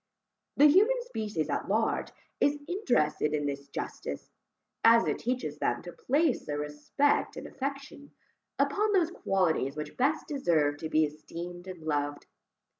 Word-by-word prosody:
The 290 - +7
human 415 +12 +5
species 210 - -3
at - - -2
large 220 +3 +1 0.3
is 290 +1 +3
interested 155 - +1
in 145 -1 -1
this 140 0 -4
justice, 70 - -6 0.5
as 230 0 +7
it - - -1
teaches 250 +2 -3
them - - 0
to - - -7
place 325 - +1
their 145 - -2
respect 150 - 0
and - - -6
affection, 275 +1 -6 0.5
upon 420 +1 +2
those 350 -4 +3
qualities 175 - 0
which 150 0 -6
best 280 +5 +1
deserve 160 - +1
to 160 - -5
be 155 0 +4
esteemed 170 +4 -8
and 180 -4 -8
loved. 145 -1 -2
190 Hz, 145 wpm, -29 LUFS, -, 0.5 s, The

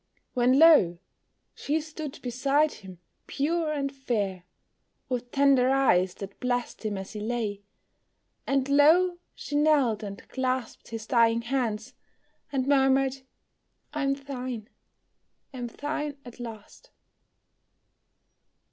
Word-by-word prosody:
When 250 +1 +3
lo! 290 - +6 0.6
she 300 +3 -1
stood 310 -2 -7
beside 275 +5 +2
him, 190 -2 -11 0.3
pure 315 +2 0
and 275 -2 -2
fair, 205 -9 -2 0.6
With 245 -1 -3
tender 275 -1 +4
eyes 190 -10 +3
that 195 0 -9
blessed 245 -1 -2
him 210 -2 -2
as 190 0 -7
he 210 - -5
lay; 215 -2 -2 0.9
And 275 -1 +1
lo! 330 +6 +5 0.2
she 290 - -6
knelt 290 -7 +3
and 200 -2 -8
clasped 260 -1 -3
his 225 -1 -6
dying 230 0 +3
hands, 240 -2 -2 0.6
And 265 -2 0
murmured, 270 -1 +3 0.8
"I 300 - -2
am 275 0 +1
thine, 255 -5 -6 0.8
am 245 -2 -4
thine 290 +3 -4
at 245 0 -12
last." 230 - -10
260 Hz, 115 wpm, -27 LUFS, 230-280 Hz, 0.9 s, lo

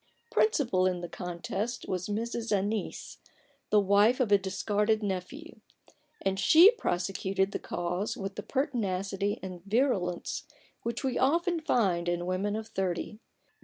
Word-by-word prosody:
Principal 265 - +2
in 180 -1 -1
the 175 - -4
contest 190 +7 -4
was 185 -1 -2
Mrs. 230 +2 -3
Annice, 205 0 -2 0.5
the 210 - +5
wife 205 +5 +4
of 240 -5 +1
a 205 - +8
discarded 210 +3 0
nephew; 205 - -5 0.6
and 195 0 0
she 330 - +8
prosecuted 190 - -1
the - - -3
cause 180 +4 -3
with 195 0 -4
the 210 - -5
pertinacity 200 -7 -1
and 180 -2 -7
virulence 200 -5 0 0.3
which 235 +2 -3
we 260 -2 0
often 340 +5 +2
find 190 - +1
in 175 0 -1
women 190 +3 -1
of 220 0 -5
thirty. 190 +3 -3
200 Hz, 135 wpm, -29 LUFS, 185-235 Hz, 0.6 s, a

